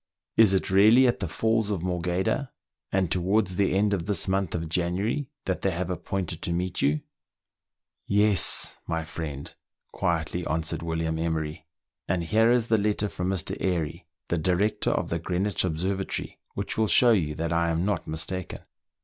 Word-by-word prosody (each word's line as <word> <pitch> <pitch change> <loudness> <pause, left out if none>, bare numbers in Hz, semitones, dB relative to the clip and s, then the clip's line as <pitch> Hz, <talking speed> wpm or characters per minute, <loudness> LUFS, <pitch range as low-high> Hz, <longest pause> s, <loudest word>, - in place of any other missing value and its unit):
" - - -65
Is 110 -4 +6
it 95 - -1
really 110 +7 +6
at 120 -5 +2
the 95 - -2
Falls 110 +5 0
of 95 -5 -2
Morgheda, 90 +8 -1 0.4
and 95 -3 0
towards 95 +1 +1
the 95 0 +1
end 105 +1 +2
of 90 -3 -2
this 100 -4 +1
month 95 -2 0
of 85 -1 -3
January, 95 - -1 0.2
that 95 - -2
they 95 - +1
have 90 +1 -3
appointed 90 -2 -3
to - - -3
meet 90 +1 -2
you 75 +2 +2 0.6
?" - - -65 0.2
"Yes, 105 -2 +5
my 80 -1 -1
friend," 75 -4 -6 0.4
quietly 85 +1 -1
answered 80 +1 -2
William 80 -1 -2
Emery, 80 -1 -3 0.4
"and 90 -1 0
here 110 +7 +3
is 120 -1 +3
the 110 -2 +2
letter 105 0 0
from 90 -1 -3
Mr. 95 -4 -1
Airy, 85 -2 -2 0.2
the 85 - 0
director 95 +6 +1
of - - -1
the 85 - 0
Greenwich 95 +4 -1
Observatory, 95 +3 -3 0.2
which - - -3
will 110 - +3
show 120 +3 +5
you 80 -9 +1
that 85 +1 -2
I 85 0 +1
am 85 +2 0
not 100 -5 -1
mistaken." 80 +3 -4
90 Hz, 175 wpm, -26 LUFS, 80-100 Hz, 0.6 s, Is